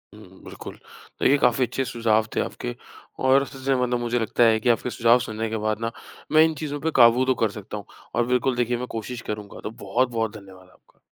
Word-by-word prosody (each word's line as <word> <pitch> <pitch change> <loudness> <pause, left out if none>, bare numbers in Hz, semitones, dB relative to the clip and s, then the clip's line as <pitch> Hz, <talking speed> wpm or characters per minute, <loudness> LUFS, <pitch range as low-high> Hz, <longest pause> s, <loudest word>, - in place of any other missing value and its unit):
उम, - - -15
बिल्कुल। - - -9 0.5
देखिए, 140 +2 +5
काफ़ी 125 0 +3
अच्छे 135 +2 -2
सुझाव 115 -2 +1
थे - - +1
आपके - - -5 0.5
और 135 +1 +5
इसी 135 - -10
से 135 -1 +3
मतलब 125 -1 0
मुझे 120 0 -1
लगता 115 +2 +1
है 110 -1 +4
कि 120 - 0
आपके 120 +1 +1
सुझाव 120 0 +4
सुनने 110 0 -3
के 110 - -2
बाद 110 0 -1
ना, 115 0 -1 0.4
मैं 155 +1 +7
इन 160 - 0
चीज़ों 145 -1 -4
पे - - +1
काबू 120 +2 +6
तो 130 - +3
कर 110 - +3
सकता 105 +1 -7
हूँ। 100 - -8 0.3
और 120 0 +2
बिल्कुल, 125 +1 +1
देखिए, 120 0 0
मैं 125 +1 -5
कोशिश 120 +2 -6
करूँगा। 105 -1 -6
तो 105 - -4
बहुत-बहुत 115 0 0
धन्यवाद 95 -2 -15
आपका। - - -28
120 Hz, 220 wpm, -24 LUFS, 110-125 Hz, 0.5 s, मैं